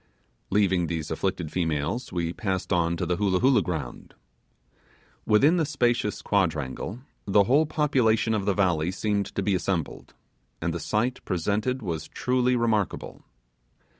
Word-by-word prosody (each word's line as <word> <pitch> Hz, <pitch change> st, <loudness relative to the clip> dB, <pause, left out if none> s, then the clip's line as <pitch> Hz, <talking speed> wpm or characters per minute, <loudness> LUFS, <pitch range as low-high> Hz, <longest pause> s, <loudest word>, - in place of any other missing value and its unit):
Leaving 95 Hz, -4 st, +2 dB
these 80 Hz, -2 st, -4 dB
afflicted 85 Hz, -1 st, -2 dB
females, 80 Hz, -, -2 dB
we 85 Hz, -1 st, -2 dB
passed 95 Hz, -1 st, -2 dB
on 85 Hz, -1 st, +1 dB
to 90 Hz, -, -2 dB
the 90 Hz, 0 st, -1 dB
Hoolah 95 Hz, -3 st, +1 dB
Hoolah 130 Hz, +3 st, +4 dB
ground. 80 Hz, -9 st, -5 dB, 1.1 s
Within 140 Hz, +11 st, +5 dB
the 165 Hz, -, +2 dB
spacious 120 Hz, -7 st, 0 dB
quadrangle, 90 Hz, -, -1 dB, 0.3 s
the 100 Hz, 0 st, +5 dB
whole 145 Hz, +9 st, +3 dB
population 120 Hz, -8 st, +2 dB
of 105 Hz, -2 st, -1 dB
the 100 Hz, -, +2 dB
valley 90 Hz, -5 st, +1 dB
seemed 100 Hz, +1 st, -1 dB
to 100 Hz, -, -1 dB
be 100 Hz, -, +1 dB
assembled, 90 Hz, -2 st, -3 dB, 0.4 s
and 85 Hz, +3 st, -2 dB
the 85 Hz, -, -3 dB
sight 120 Hz, +7 st, -1 dB
presented 105 Hz, +8 st, -1 dB
was 85 Hz, -5 st, -4 dB
truly 125 Hz, 0 st, +1 dB
remarkable. 115 Hz, -4 st, -1 dB
100 Hz, 140 wpm, -26 LUFS, 85-115 Hz, 1.1 s, Within